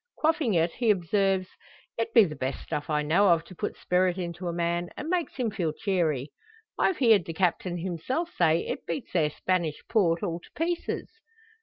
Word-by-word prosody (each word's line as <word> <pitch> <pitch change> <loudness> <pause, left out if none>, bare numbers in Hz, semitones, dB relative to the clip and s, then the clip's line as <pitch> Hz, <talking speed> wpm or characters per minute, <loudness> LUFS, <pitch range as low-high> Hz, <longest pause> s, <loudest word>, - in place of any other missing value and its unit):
Quaffing 310 - +2
it, 165 0 +2
he 235 +3 -1
observes: 195 0 +2 0.5
"It 230 0 -2
be 230 -1 +8
the 155 -6 -3
best 135 0 -3
stuff 145 0 -4
I 150 -1 +1
know 175 +7 +4
of 165 -1 +4
to 185 - -13
put - - -4
spirit 180 0 +1
into 175 0 -4
a - - 0
man, 170 +1 -1
an' 305 - -5
makes 355 -3 -1
him 245 -5 -1
feel 175 -7 -1
cheery. 155 -8 -1 0.4
I've 380 - +2
heerd 220 - +5
the 165 - -5
Captain 175 0 0
hisself 190 - -3
say, 165 -1 +3
it - - -5
beats 165 - -4
their 160 -4 +3
Spanish 170 -1 -1
Port 175 -6 +2
all 170 -4 -2
to - - -18
pieces." 340 +1 -2
180 Hz, 190 wpm, -27 LUFS, 165-210 Hz, 0.5 s, be